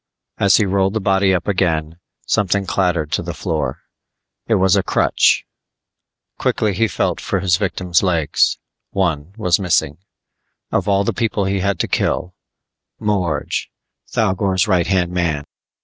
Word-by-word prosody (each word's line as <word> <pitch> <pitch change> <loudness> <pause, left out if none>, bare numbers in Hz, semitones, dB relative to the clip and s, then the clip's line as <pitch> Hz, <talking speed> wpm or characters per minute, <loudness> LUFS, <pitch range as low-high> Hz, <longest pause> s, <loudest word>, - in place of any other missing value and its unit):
As 100 -1 +5
he 110 - +2
rolled 95 +1 +1
the - - +1
body 95 -1 +2
up 90 -1 -1
again, 85 -4 0 0.3
something 100 0 +1
clattered 90 -5 0
to - - 0
the - - -6
floor. - - -3 0.7
It 115 - +3
was 95 -2 +3
a - - +3
crutch. - - +2 0.9
Quickly 105 -2 0
he 115 +5 +1
felt 100 - -1
for 95 - -1
his 90 -2 +2
victim's 90 -3 0
legs; 85 -6 +1 0.3
one 85 -4 -1
was 90 -5 +2
missing. 80 -5 0 0.7
Of - - 0
all 100 0 +3
the - - -1
people 110 -4 -1
he 95 0 0
had 100 +1 0
to - - -1
kill 90 +2 -1 0.6
Morge! 90 -8 -1 0.4
Thougor's 95 -2 +1
right 90 -4 +2
hand 90 -2 +1
man. 85 -5 -1
95 Hz, 150 wpm, -19 LUFS, 85-100 Hz, 0.9 s, As